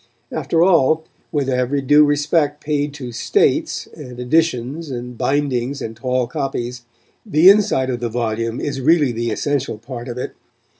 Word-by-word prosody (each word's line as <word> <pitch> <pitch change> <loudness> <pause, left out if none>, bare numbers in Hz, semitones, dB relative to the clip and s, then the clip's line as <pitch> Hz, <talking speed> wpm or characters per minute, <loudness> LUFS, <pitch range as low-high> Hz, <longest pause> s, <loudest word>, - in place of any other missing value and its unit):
After 160 +2 +1
all, 160 -3 +4 0.3
with 145 -3 -1
every 130 +2 0
due 145 +3 +5
respect 145 0 +1
paid 145 -1 -1
to 130 -4 -7
"states" - - +1
and 125 -1 -10
editions 145 +2 0
and 125 -1 -6
bindings 135 0 -1
and 115 0 -6
tall 125 +1 -1
copies, 125 -2 -4 0.4
the 185 -3 +6
inside 200 -11 +2
of 120 - -3
the 120 0 -2
volume 115 0 -2
is 135 -2 -3
really 150 -1 +4
the 120 0 -2
essential 135 +1 -1
part 120 +2 -8
of 120 0 -6
it. 125 - -4
135 Hz, 155 wpm, -19 LUFS, 120-150 Hz, 0.4 s, the